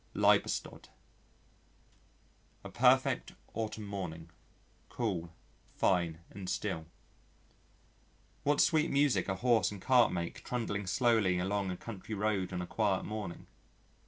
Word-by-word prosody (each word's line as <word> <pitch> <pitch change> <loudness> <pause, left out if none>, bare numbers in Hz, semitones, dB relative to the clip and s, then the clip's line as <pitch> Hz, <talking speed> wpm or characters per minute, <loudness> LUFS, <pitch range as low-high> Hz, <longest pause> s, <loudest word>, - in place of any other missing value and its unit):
Liebestod - - +1 1.7
A - - -7
perfect - - +3 0.2
autumn 110 -1 -4
morning 85 -5 -6 0.6
cool, 90 -8 -2 0.4
fine 85 -3 +1
and 95 -2 -7
still. 80 -1 -2 1.5
What 145 +1 +1
sweet 160 +1 +3
music 140 -1 +2
a 95 - 0
horse 120 +2 +3
and 100 - -8
cart 125 +4 +4
make 85 -1 -4
trundling 105 -5 -3
slowly 110 -4 +3
along 95 +2 -1
a 90 - -3
country 110 0 -7
road 100 -2 0
on 90 -1 -3
a - - -4
quiet 100 0 0
morning! 105 -5 -5
100 Hz, 115 wpm, -32 LUFS, 90-115 Hz, 1.7 s, cart